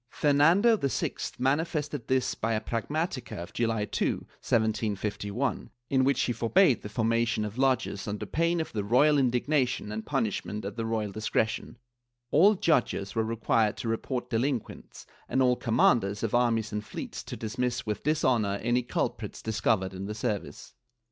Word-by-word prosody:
Fernando 165 +11 +4
VI 140 -8 -1 0.2
manifested 145 0 -1
this 130 -1 +1
by 115 +1 -1
a 110 - +1
pragmatica 135 +4 -3
of 85 +1 -7
July 115 -3 0
2, - - 0 0.2
1751, 110 +2 -1 0.2
in 130 -1 +4
which 140 +1 +2
he 120 - 0
forbade 120 - +3
the 105 - -7
for 110 +1 -1
mation 115 -1 +1
of 105 +4 -6
lodges 130 -6 +1
under 105 0 -3
pain 170 +2 0
of 160 - -4
the 105 -2 -1
royal 140 +8 +4
indignation 125 -2 +1
and 110 +1 -4
punish 120 -8 -1
ment 105 -1 -6
at 100 0 -5
the 115 -1 -3
royal 110 -2 -1
discretion; 110 +1 -2 0.5
all 200 +8 +6
judges 125 - +1
were 115 - +1
required 110 -1 +1
to - - -5
report 120 +2 -2
delinquents, 120 +1 -3 0.2
and - - +1
all 125 -1 +4
commanders 110 -4 +2
of 115 - -1
armies 115 -3 +2
and 105 0 -3
fleets - - -6
to - - -7
dismiss 125 +2 -2
with 105 -1 -3
dishonor 120 -10 +1
any 120 +2 +2
culprits 120 - -3
discovered 105 -3 0
in 95 +1 -5
the 105 - -4
service. 105 -3 -4
115 Hz, 160 wpm, -28 LUFS, 110-135 Hz, 0.5 s, all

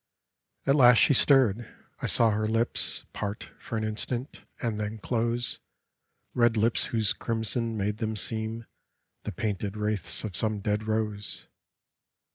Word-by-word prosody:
At 135 - +3
last 125 -4 +7
she 145 - +5
stirred. 120 -5 +3 0.3
I - - -1
saw 115 -1 +4
her 110 +1 0
lips 115 +2 0
Part 105 0 -5
for 115 - -5
an 110 - -2
instant, 120 +5 -3 0.2
and 115 -3 -2
then 105 +1 -3
close 120 +2 -1 0.4
— - - -50
Red 120 -2 +3
lips 110 +2 +2
whose 110 -3 +1
crimson 115 0 -2
made 105 +1 -1
them 110 0 -2
seem 110 +2 -2 0.6
The 105 - -3
painted 105 0 -3
wraiths 105 -5 0
of 105 -5 -5
some 110 0 +1
dead 105 +2 -2
rose. 105 -1 -2
110 Hz, 145 wpm, -27 LUFS, 105-115 Hz, 0.6 s, last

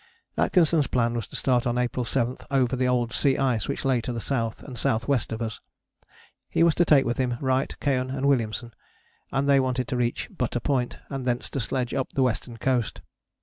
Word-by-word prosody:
Atkinson's 165 -5 +3
plan 120 -1 +1
was 115 -4 -3
to - - -11
start 125 -2 +2
on 120 0 0
April 125 0 0
7 120 +1 0
over 130 -2 +2
the 130 0 +1
old 120 -2 +1
sea 135 -2 +2
ice 120 -8 +1
which - - -3
lay 130 -3 +2
to 125 - -4
the 120 - -3
south 115 -2 -2
and 130 - -8
south 110 0 0
west 140 -5 +1
of 110 +1 -2
us: 110 -2 -4 0.9
he - - +2
was 170 -1 +5
to 175 - +3
take 145 -4 +5
with 120 +2 -1
him 125 -2 0
Wright, 130 0 0
Keohane 130 -2 0
and 135 +1 -1
Williamson, 120 -3 0 0.6
and 135 +1 0
they 140 -1 +5
wanted 130 -1 0
to 130 - -1
reach 120 -1 -1
Butter 125 -1 -1
Point, 125 -1 -1
and 135 -2 -4
thence 120 0 -1
to 140 - -2
sledge 125 0 -2
up 135 -2 -2
the 135 - +2
western 120 -1 -2
coast. 125 -1 0
125 Hz, 215 wpm, -26 LUFS, 120-135 Hz, 0.9 s, was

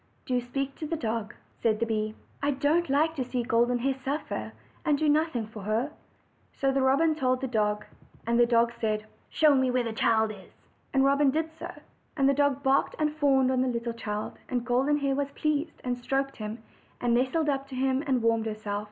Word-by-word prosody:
"Do 250 -2 0
speak 275 +3 -3
to 310 - -4
the 330 - -1
dog," 225 -6 -3 0.3
said 220 -2 +2
the 230 - +1
bee. 215 -1 -2 0.3
"I 285 - +1
don't 290 +4 +1
like 310 +4 +2
to 260 - 0
see 250 0 -2
Golden 240 +1 +2
Hair 270 +3 0
suffer, 270 +3 -4 0.3
and 300 -3 +2
do 310 - +1
nothing 300 -6 +2
for 215 -1 -10
her." 220 +8 -1 0.6
So 270 0 +1
the 270 0 +1
robin 280 +5 +4
told 255 -4 +1
the 265 - -2
dog. 210 -3 0 0.4
The 235 +1 +4
dog 235 0 +3
said: 215 -2 -2 0.2
"Show 305 -2 +4
me 260 -1 +3
where 250 0 +1
the 230 -1 -3
child 220 0 +2
is." 195 -3 -13 0.4
And 270 0 +3
Robin 280 +1 +4
did 320 +3 -1
so. 320 - -7 0.5
And 270 -2 +4
the 275 - +5
dog 280 -1 +1
barked 270 0 +2
and 300 -1 0
fawned 270 -4 +3
on 255 -1 +2
the 260 - +1
little 235 -1 -2
child; 210 -2 -5
and 245 -1 -1
Golden 260 +4 +2
Hair 280 -2 0
was 280 0 -1
pleased, 305 +2 -1
and 250 -1 -1
stroked 270 +3 -2
him, 220 +1 -6 0.4
and 240 -1 +1
nestled 265 +6 +1
up 275 -1 0
to 270 - -8
him 265 +1 +1
and 255 -4 +1
warmed 230 -1 +2
herself. 215 -1 -3
260 Hz, 210 wpm, -28 LUFS, 230-280 Hz, 0.6 s, the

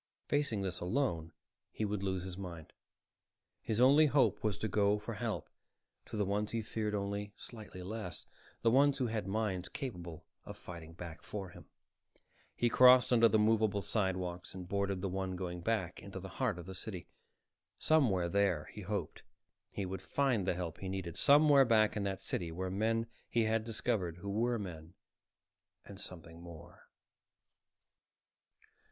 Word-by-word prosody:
Facing 140 -9 +1
this 90 -2 -2
alone, 90 - -1 0.4
he 110 - -2
would 105 -1 -2
lose 95 -2 -1
his 95 -1 -6
mind. 85 -4 -8 0.9
His 110 0 -1
only 140 +5 +7
hope 120 -8 +2
was 105 -5 0
to 110 - -2
go 105 0 +3
for 105 +2 -6
help 110 0 -3 0.6
to - - -5
the 105 - +1
ones 105 +2 -1
he 115 -1 -2
feared 105 -1 -2
only 100 0 -3
slightly 105 -6 -9
less, 100 -3 -5 0.4
the 115 - +5
ones 140 +2 +5
who 130 - 0
had 110 -4 -2
minds 100 -3 -1
capable 85 - -6 0.2
of 105 - -9
fighting 85 -4 -9
back 85 -1 -8
for 100 -3 -6
him. - - -13 0.9
He 120 - +2
crossed 125 0 +7
under 115 -1 +7
the 110 - +4
moveable 110 -2 +2
sidewalks 95 -4 -2
and 90 -1 -7
boarded 100 0 -1
the 100 - -1
one 95 0 -2
going 90 -1 -4
back 95 -3 -1
into 95 -1 -7
the 95 +1 -8
heart 110 0 -1
of 85 - -8
the 95 - -7
city. 95 -2 -6 0.7
Somewhere 115 - +3
there, 95 -4 +1
he 105 - -7
hoped, 95 -4 -4 0.5
he 100 - -4
would 95 0 -5
find 120 -4 +1
the 90 - +2
help 85 -3 -4
he 95 - -4
needed. 95 -3 -4
Somewhere 145 -1 +6
back 110 -4 +4
in 105 - -1
that 95 -1 -2
city 85 -2 -3
were 90 +2 -3
men 115 +3 +1 0.2
he 115 - +2
had 110 0 +1
discovered 110 -6 -1
who 100 +3 -5
were 120 +3 +1
men 85 -5 -7 0.9
and 100 0 -10
something 85 -2 -9
more. 85 -3 -12
100 Hz, 165 wpm, -34 LUFS, 90-110 Hz, 0.9 s, only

